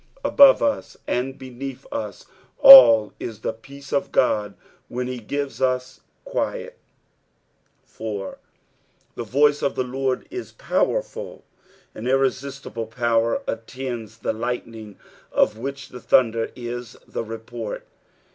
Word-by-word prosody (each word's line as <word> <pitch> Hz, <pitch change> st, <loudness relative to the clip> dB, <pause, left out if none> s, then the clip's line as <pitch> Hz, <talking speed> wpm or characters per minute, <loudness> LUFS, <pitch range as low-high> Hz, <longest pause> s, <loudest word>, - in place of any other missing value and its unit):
Above 280 Hz, -1 st, +6 dB
ub 285 Hz, -1 st, +1 dB, 0.2 s
and 130 Hz, +2 st, -2 dB
beneath 130 Hz, 0 st, -8 dB
us 105 Hz, -2 st, -5 dB, 0.3 s
all 115 Hz, -5 st, +10 dB
is 115 Hz, -3 st, -6 dB
tne -, -, -2 dB
peace 140 Hz, +2 st, -11 dB
of 140 Hz, -, +1 dB
Ood 105 Hz, -4 st, +2 dB, 0.3 s
when 125 Hz, +1 st, -4 dB
be 125 Hz, 0 st, -5 dB
^*ea 140 Hz, +4 st, -4 dB
us 130 Hz, 0 st, -1 dB, 0.3 s
quiet. -, -, -3 dB, 1.1 s
4. 105 Hz, -3 st, -6 dB, 0.4 s
" -, -, -41 dB
The -, -, -4 dB
toiee 145 Hz, +5 st, +2 dB
of 140 Hz, -, -1 dB
tht 130 Hz, -, -1 dB
Lord 130 Hz, 0 st, -2 dB
u 370 Hz, +1 st, -4 dB
powerful." -, -, -2 dB, 0.5 s
An 110 Hz, -, -8 dB
irreaiBtible 135 Hz, -3 st, -2 dB
power 115 Hz, -1 st, 0 dB
attends 115 Hz, -1 st, -6 dB
the 110 Hz, -, -2 dB
lightning 115 Hz, -2 st, -5 dB, 0.3 s
of 110 Hz, -, +1 dB
which 135 Hz, +1 st, -6 dB
tbe 125 Hz, -, -10 dB
thunder 115 Hz, -2 st, +2 dB
is 120 Hz, -1 st, -7 dB
the -, -, -4 dB
report. 115 Hz, 0 st, -7 dB
125 Hz, 125 wpm, -23 LUFS, 115-135 Hz, 1.1 s, all